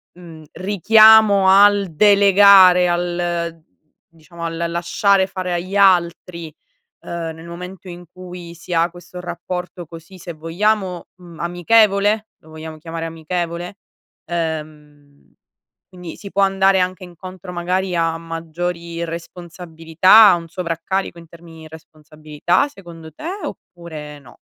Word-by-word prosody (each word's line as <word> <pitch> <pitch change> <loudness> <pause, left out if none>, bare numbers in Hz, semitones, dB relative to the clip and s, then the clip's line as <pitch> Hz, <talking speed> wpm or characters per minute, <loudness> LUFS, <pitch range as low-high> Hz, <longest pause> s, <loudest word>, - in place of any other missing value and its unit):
mhmm, 165 -3 -13
richiamo 210 0 +5
al 200 +1 +5
delegare 195 -1 +6
al 175 -1 -3 0.5
diciamo 170 +1 -13
al 165 0 -4
lasciare 175 +3 +1
fare 185 -1 -5
agli 185 +3 -3
altri, 170 -3 +1 0.5
uhm, 170 -1 -6
nel 160 +1 -13
momento 180 +2 -10
in 175 0 -10
cui 180 -2 -11
si 170 +1 -9
ha 165 +1 +2
questo 180 +1 -12
rapporto 180 0 -7
così, 165 +4 -13
se 175 -1 -9
vogliamo, 180 +3 -2
mhmm, 175 -3 -15
amichevole? 205 +4 +2
Lo 160 - -21
vogliamo 160 0 -10
chiamare 165 +1 -7
amichevole? 170 +2 -5 0.5
Ehm, 150 -3 -7 0.5
quindi 180 -3 -11
si 200 - -10
può 200 - -1
andare 195 0 +2
anche 185 0 -3
incontro 180 +1 -11
magari 180 +1 -2
a 165 -1 0
maggiori 170 +1 -5
responsabilità, 170 +3 +2
a - - +3
un 165 -1 -8
sovraccarico 175 +2 -4
in 170 -1 -14
termini 165 0 -15
di 160 - -11
responsabilità 155 - -3
secondo 170 - -13
te, 305 - -9 0.2
oppure 155 -4 -9
no? 125 -4 -18
175 Hz, 125 wpm, -19 LUFS, 165-185 Hz, 0.5 s, delegare